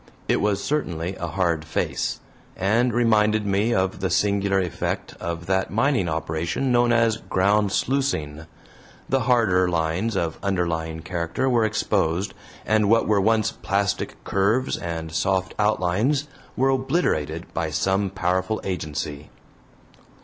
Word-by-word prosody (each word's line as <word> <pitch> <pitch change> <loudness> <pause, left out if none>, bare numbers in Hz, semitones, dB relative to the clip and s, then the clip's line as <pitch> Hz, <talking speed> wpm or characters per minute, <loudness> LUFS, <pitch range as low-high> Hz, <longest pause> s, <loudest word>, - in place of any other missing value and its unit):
It - - +2
was 100 -1 0
certainly 95 - -2
a 85 - -4
hard 85 -1 0
face, 80 - -2 0.4
and 115 +6 +2
reminded 110 -2 +3
me 100 +3 +1
of 95 -3 0
the 95 -1 -1
singular 100 +2 +2
effect 90 -3 -3
of 85 0 -4
that 95 +1 0
mining 115 - +1
operation 80 - -1
known 120 0 +4
as 115 -1 +3
"ground 100 0 +1
sluicing"; 80 - -1 0.6
the 135 - +2
harder 115 -7 +3
lines 85 +6 -1
of 80 -3 -2
underlying 85 -4 -1
character 85 +8 -2
were 120 -3 +3
exposed, 100 -4 0 0.3
and 110 -2 +2
what 115 +1 +4
were 105 -2 +3
once 110 +1 +2
plastic 100 +1 -1
curves 110 +7 +1
and 80 -2 -5
soft 95 +3 0
outlines 105 +8 +1 0.3
were 135 +2 +3
obliterated 130 - 0
by 80 -1 -1
some 95 +5 0
powerful 95 +2 -1
agency. 75 -4 -4
95 Hz, 130 wpm, -24 LUFS, 85-110 Hz, 0.6 s, known